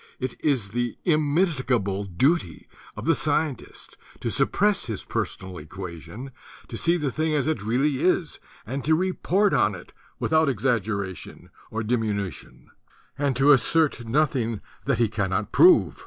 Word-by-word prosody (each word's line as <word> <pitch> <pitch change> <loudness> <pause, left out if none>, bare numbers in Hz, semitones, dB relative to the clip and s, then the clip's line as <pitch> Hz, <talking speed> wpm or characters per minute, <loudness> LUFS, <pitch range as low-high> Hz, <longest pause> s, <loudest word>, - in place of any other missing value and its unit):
It 130 -1 -3
is 125 -10 0
the 120 +1 -2
immitigable 145 - +1
duty 95 - 0 0.3
of - - -6
the 165 - +4
scien 150 -1 0
tist - - -14 0.2
to - - -2
suppress 205 +1 +2
his 110 -5 -4
personal 95 -1 -4
equation, 90 - -8 0.4
to - - -6
see 170 +1 +2
the 150 -5 -2
thing 155 +1 0
as 145 - +1
it 155 -9 -1
really 130 +6 0
is, 180 -2 +1 0.3
and 135 +5 -4
to 160 +1 +3
report 190 +3 +1
on 105 -1 +2
it 90 - -13 0.3
without 160 -2 +2
exaggeration 105 - -2 0.2
or 110 0 -3
diminution, 105 -5 -3 0.4
and 140 -2 0
to 140 +3 +5
assert 145 0 +3
noth 145 +4 +2
ing 115 -4 -2 0.2
that - - +1
he 115 - +3
cannot 105 -1 -2
prove. 360 +1 +5
130 Hz, 150 wpm, -25 LUFS, 105-155 Hz, 0.4 s, to